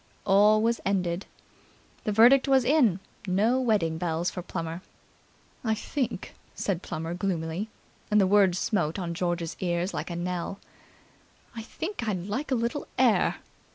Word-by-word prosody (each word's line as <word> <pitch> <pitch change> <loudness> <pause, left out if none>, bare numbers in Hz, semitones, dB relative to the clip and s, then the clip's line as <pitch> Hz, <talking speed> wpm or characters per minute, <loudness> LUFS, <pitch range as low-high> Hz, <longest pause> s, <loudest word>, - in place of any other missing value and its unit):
All 210 +2 +5
was 230 +1 +1
ended. 185 -2 -1 0.8
The 215 - +1
verdict 245 +6 +6
was 265 -2 +4
in. 245 - +4 0.3
No 215 +8 +2
wedding 190 -10 +1
bells 170 +1 -1
for 180 - -5
Plummer. 165 -1 -5 0.8
"I 220 -2 +1
think," 260 +4 -3 0.2
said 185 -4 -2
Plummer 165 -1 -4
gloomily, 180 +1 -2 0.4
and 210 - +4
the 195 - +5
words 190 -2 +4
smote 175 -5 0
on 175 -3 -3
George's 175 -1 -2
ear 175 -1 0
like - - -4
a 170 - -4
knell, 180 +2 -3 1.0
"I 225 - -5
think 320 - -5
I'd 185 -4 -2
like 255 +9 -3
a 265 - +2
little 235 +4 -2
air." - - +3
195 Hz, 150 wpm, -27 LUFS, 175-225 Hz, 1.0 s, verdict